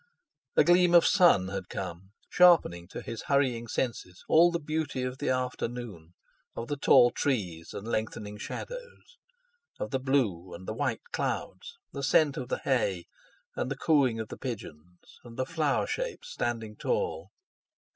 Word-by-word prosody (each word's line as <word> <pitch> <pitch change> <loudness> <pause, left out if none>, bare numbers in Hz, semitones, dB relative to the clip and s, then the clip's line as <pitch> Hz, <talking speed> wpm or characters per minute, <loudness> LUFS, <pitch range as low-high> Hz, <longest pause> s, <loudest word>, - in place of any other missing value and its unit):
A - - +6
gleam 175 0 +5
of 170 - +7
sun 170 - +5
had 95 -1 -5
come, 95 +1 -6
sharpening 165 - +4
to - - -8
his 115 - -6
hurrying 130 -5 +1
senses 110 -7 -3
all 170 +2 +6
the 170 0 -2
beauty 155 -4 -2
of 130 +1 -4
the 145 - -1
afternoon, 120 -9 -4 0.4
of 115 - -5
the 145 - -1
tall 120 -3 +6
trees 90 - -2
and 100 - -7
lengthening 110 -2 -3
shadows, 485 - -8 0.6
of - - -4
the 135 - 0
blue, 105 -11 0
and 95 +2 -11
the - - -2
white - - -2
clouds, - - -4 0.2
the 140 - -5
scent 140 +1 +3
of 125 -1 -5
the - - 0
hay, 100 -10 0 0.5
and - - -2
the 135 - -3
cooing 135 -7 +2
of 110 - -5
the - - -7
pigeons; 90 - -8
and 115 -1 -12
the 130 - 0
flower 155 -2 0
shapes - - -4
standing 115 - -3
tall. 475 - -2
125 Hz, 160 wpm, -29 LUFS, 100-155 Hz, 0.6 s, of